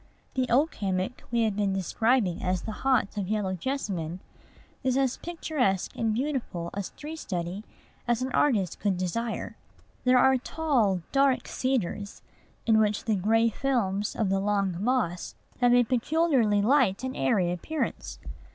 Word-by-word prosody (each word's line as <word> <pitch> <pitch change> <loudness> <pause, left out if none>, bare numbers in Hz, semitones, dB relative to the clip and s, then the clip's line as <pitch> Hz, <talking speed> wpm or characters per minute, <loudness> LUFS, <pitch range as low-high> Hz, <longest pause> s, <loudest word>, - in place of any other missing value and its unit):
The 260 -1 0
oak 285 +7 +3
hammock 190 +4 -1
we 235 -1 +2
have 215 -3 0
been 200 -1 0
describing 195 +1 +1
as 185 -1 -1
the 220 - -4
haunt 250 -3 0
of 195 -3 -2
yellow 205 -2 -1
jessamine 185 - -3 0.6
is 260 0 +1
as 265 -2 +1
picturesque 300 - -1
and 225 -1 0
beautiful 235 - -2
a 200 - -3
tree 305 +2 -6
study 180 - -4 0.4
as 240 +1 +1
an 260 - -3
artist 210 - +1
could 200 -3 0
desire. 225 +6 -3 0.5
There 255 0 +5
are 265 +1 +5
tall, 245 - 0
dark 275 -1 +2
cedars, 215 -6 -2 0.4
in 220 -1 +4
which 210 -1 +1
the 220 - +2
gray 225 +4 +3
films 210 -6 -1
of 215 -4 0
the 195 0 +2
long 195 -2 0
moss 220 -8 -1 0.2
have 245 -1 +5
a 245 - +6
peculiarly 250 -4 +2
light 240 -4 +3
and 260 0 -3
airy 175 +7 +1
appearance. 300 - -3
220 Hz, 150 wpm, -27 LUFS, 195-260 Hz, 0.6 s, a